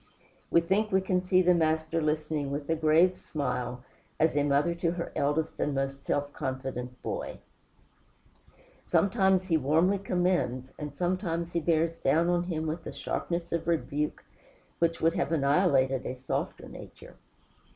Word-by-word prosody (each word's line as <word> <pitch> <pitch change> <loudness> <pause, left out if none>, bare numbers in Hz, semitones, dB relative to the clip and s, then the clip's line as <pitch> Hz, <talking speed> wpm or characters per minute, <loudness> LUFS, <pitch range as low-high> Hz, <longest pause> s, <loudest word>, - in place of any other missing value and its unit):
We 170 - +5
think 205 +5 +1
we 190 - +4
can 185 -1 +1
see 185 0 +3
the 180 0 +5
Master 160 0 +1
listening 150 -1 -1
with 140 +1 -4
a - - +3
grave 160 +4 +4
smile, 125 -4 -3 0.4
as 160 -1 +3
a 145 - +3
mother 145 +4 +2
to 170 0 -1
her 170 -1 -4
eldest 145 +3 0
and 145 - 0
most 135 0 -2
self 145 +1 -2
confident 130 -2 -4
boy. - - -4 1.5
Sometimes 190 -2 +3
he 175 -4 +2
warmly 160 +8 +2
commends, 175 -10 0
and 150 -1 -5
sometimes 175 0 -1
he 170 - +2
bears 165 0 +1
down 165 +5 +2
on 175 0 +1
him 160 -3 -2
with 160 +1 -4
a - - -4
sharpness 170 0 -3
of 170 -1 -2
rebuke 150 -2 -1 0.6
which 165 0 +1
would 165 +1 +3
have - - -1
annihilated 140 -4 +2
a 130 - -4
softer 130 +1 -4
nature. - - -12
160 Hz, 155 wpm, -29 LUFS, 140-175 Hz, 1.5 s, We